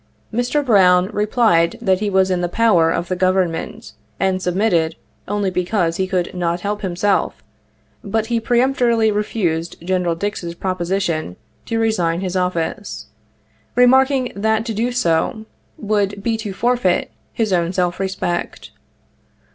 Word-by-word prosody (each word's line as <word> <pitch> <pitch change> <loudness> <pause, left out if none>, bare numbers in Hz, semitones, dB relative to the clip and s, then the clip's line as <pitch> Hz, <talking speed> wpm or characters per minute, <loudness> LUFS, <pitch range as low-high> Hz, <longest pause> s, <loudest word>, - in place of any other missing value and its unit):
Mr. 245 +5 0
Brown 185 -4 +4
replied 210 -4 +2
that 190 -5 +1
he 210 0 -1
was 190 -1 +2
in 180 -1 0
the 175 - -1
power 175 -5 +3
of 170 - -2
the 185 - -1
Government 185 +4 -1 0.3
and 190 -1 0
submitted 180 -3 +1 0.3
only 205 -1 -1
because 180 -2 0
he 190 - 0
could 185 -2 -1
not 175 -1 -1
help 205 +2 -3
himself, 195 +1 0 0.6
but 220 +2 -1
he 235 0 0
peremptorily 235 -2 +2
refused 180 -6 -1
Gen. 180 -1 0
Dix's 175 -3 -4
proposition 175 - -2 0.3
to 230 - -1
resign 180 -7 0
his 185 -1 -3
office, 180 +3 -2 0.7
remarking 260 +1 +4
that 220 +2 0
to 230 - -3
do 230 +4 -1
so 220 0 0 0.3
would 200 -1 -1
be 230 0 0
to 220 -2 -5
forfeit 235 -2 0 0.2
his 220 -4 -1
84 175 -1 +3
own 170 - -3
self 180 -1 -1
respect. 190 -2 -3
195 Hz, 140 wpm, -19 LUFS, 180-225 Hz, 0.7 s, Brown